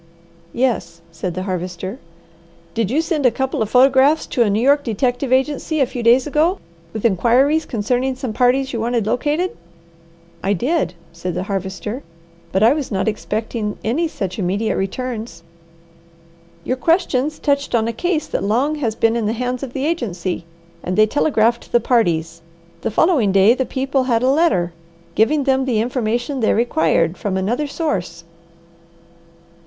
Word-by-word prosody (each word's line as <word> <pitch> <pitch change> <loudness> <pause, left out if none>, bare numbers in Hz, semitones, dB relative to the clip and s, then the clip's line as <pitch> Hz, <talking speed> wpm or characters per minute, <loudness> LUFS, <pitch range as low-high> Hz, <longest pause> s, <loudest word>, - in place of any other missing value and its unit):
"Yes," 195 -9 -1
said 165 +1 -4
the 185 - -3
Harvester. 185 +3 -4 0.7
"Did 225 -4 0
you 285 +7 +2
send 320 -4 -1
a - - +6
couple 265 +1 -2
of 215 - 0
photographs 270 +5 +4
to 245 - -1
a 225 - +4
New 205 +2 +1
York 285 +4 +3
detective 245 +3 -1
agency 290 +4 +1
a 270 - +4
few 245 0 -6
days 240 +3 +4
ago 315 +6 +1 0.3
with 220 +1 -5
inquiries 250 - +3
concerning 250 +3 -1
some 255 -3 -4
parties 260 +3 +2
you 230 - -2
wanted 235 -2 0
located?" 295 +10 0 0.9
"I 195 - +1
did," 245 - 0 0.2
said 170 +1 -5
the - - -2
Harvester. 195 +5 -4 0.5
"But 190 +2 +2
I 230 +4 +6
was 290 -5 -4
not 190 0 -1
expecting 215 0 -3
any 280 +11 0
such 195 - -5
immediate 200 +4 0
returns." 220 -3 -4 1.2
"Your 255 - -1
questions 305 -1 +1
touched 280 -3 0
on 225 -1 +2
a 230 - -2
case 330 +4 -1
that - - -3
long 245 +9 +1
has 230 -7 -2
been 225 0 +2
in 230 -3 0
the 220 - 0
hands 250 +1 -3
of 265 -3 -6
the 270 +1 -2
agency, 185 - -2 0.4
and 180 +1 -3
they 215 - +7
telegraphed 235 -2 +1
the 240 - +4
parties. 170 -9 0 0.4
The - - -1
following 245 - +3
day 195 +4 +5
the 260 0 -2
people 270 0 -1
had 235 -2 +1
a 260 - +4
letter, 270 - +2 0.4
giving 280 +7 +2
them 265 -1 +2
the 240 -5 +1
information 240 +3 -1
they 220 - +2
required, 165 -6 +1
from 195 -2 -2
another 240 +10 -1
source." 180 - -3
235 Hz, 165 wpm, -19 LUFS, 200-270 Hz, 1.2 s, they